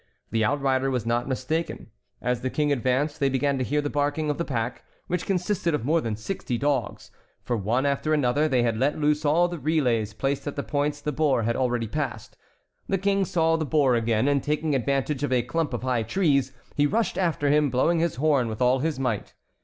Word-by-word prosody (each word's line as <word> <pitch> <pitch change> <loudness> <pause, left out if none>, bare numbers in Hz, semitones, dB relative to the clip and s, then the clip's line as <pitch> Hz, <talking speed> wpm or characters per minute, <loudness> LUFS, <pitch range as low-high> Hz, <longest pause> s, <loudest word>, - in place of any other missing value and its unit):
The 110 0 +1
outrider 135 +1 +1
was 125 -4 -1
not 120 +1 0
mistaken. 135 -1 -3 0.3
As 125 0 0
the 130 - -1
King 150 +2 0
advanced 135 +3 0
they 140 - +2
began 135 +1 0
to - - 0
hear 150 +4 0
the 145 - -2
barking 145 +1 0
of 145 - -5
the - - +1
pack, 125 -4 -3 0.2
which 180 0 -3
consisted 180 -3 0
of 120 - -4
more 160 +3 +2
than 115 -5 -2
sixty 120 - -4
dogs, 135 -5 -2 0.3
for 120 - -1
one 115 +6 0
after 140 +2 0
another 145 0 +2
they 130 -5 +2
had 115 -2 0
let 140 +3 +1
loose 150 0 +1
all 165 +4 +4
the 175 -2 -6
relays 125 -8 0
placed 135 +4 -2
at 145 - -3
the 140 - -3
points 145 0 -1
the 150 - -2
boar 140 -5 +1
had 115 +2 0
already 120 -3 0
passed. 125 -4 -4 0.5
The 195 - +2
King 195 +1 +1
saw 165 -1 +2
the 160 - -1
boar 140 -4 +3
again, 115 +1 +1
and 140 -1 +2
taking 150 +2 -1
advantage 135 +2 0
of 145 - -1
a 125 -2 +2
clump 150 +5 -1
of 120 -1 -4
high 125 -3 +1
trees, 140 - +1 0.2
he 145 0 +3
rushed 220 +5 0
after 160 -6 +1
him, 150 -1 +3
blowing 145 +7 +2
his 170 +1 0
horn 140 -3 +2
with 110 -1 -5
all 125 +1 +3
his 155 +1 -1
might. 125 -6 -2
140 Hz, 215 wpm, -25 LUFS, 125-155 Hz, 0.5 s, all